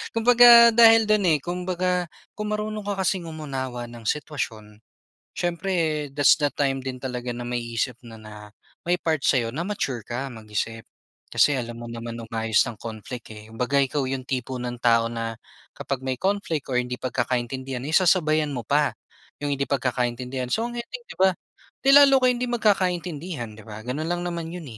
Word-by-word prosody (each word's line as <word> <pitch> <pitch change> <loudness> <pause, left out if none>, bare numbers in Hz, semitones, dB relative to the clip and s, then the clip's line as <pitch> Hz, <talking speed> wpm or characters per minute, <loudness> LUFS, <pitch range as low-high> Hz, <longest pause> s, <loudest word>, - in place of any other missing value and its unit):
kumbaga 235 0 +8
dahil 225 0 +7
do'n, 215 -1 +2
eh, - - -1
kumbaga, 180 0 -1 0.2
kung 210 0 -5
marunong 215 0 -4
ka 195 -1 -1
kasing 185 -3 -1
umunawa 130 -6 -5
ng 115 -2 -9
sitwasyon, 110 -8 -4 0.6
siyempre 170 -3 -1
that's 145 +1 +5
the 150 - +2
time 135 -2 0
din 130 -1 -6
talaga 125 -2 -4
na 120 - -6
maiisip 120 0 -3
mo 115 - -10
na, 105 -1 -12 0.3
may 175 - +3
part 155 -5 0
sa‘yo 120 -4 +2
na 160 +8 -4
mature 135 - -3
ka 130 +3 -4
mag-isip. 110 0 -5 0.4
Kasi 145 -2 +3
alam 120 -1 -5
mo 120 - -7
naman 115 0 -6
umayos 115 -1 +1
ng 115 - -12
conflict, 115 +2 -8
eh, 105 +1 -12
kumbaga 125 +5 +1
ikaw 135 0 -1
‘yong 130 0 -3
tipo 130 0 -2
ng 120 0 -4
tao 115 -1 +3
na 115 -1 -4 0.4
kapag 135 -1 -4
may 130 - 0
conflict 170 -2 -2
or 125 - +1
hindi 125 0 -2
pagkakaintindihan, 125 +1 -2
eh, 145 - -4
sasabayan 155 -5 +3
mo 120 - -3
pa, 145 +5 +1 0.5
‘yong 145 - -1
hindi 140 - 0
pagkakaintindihan. 125 -1 -2
So 230 +2 -1
ang 240 - -6
ending, 475 - -7
‘di - - -9
ba, 190 0 +4 0.5
'di 270 - +4
lalo 280 -1 +8
kayong 250 0 +4
hindi 250 - 0
magkakaintindihan, 180 - -1
‘di 110 - -11
ba, 110 0 -9
gano'n 130 +7 -3
lang 175 +1 -2
naman 170 -2 -4
‘yon, 175 -2 -7
135 Hz, 175 wpm, -24 LUFS, 120-180 Hz, 0.6 s, kumbaga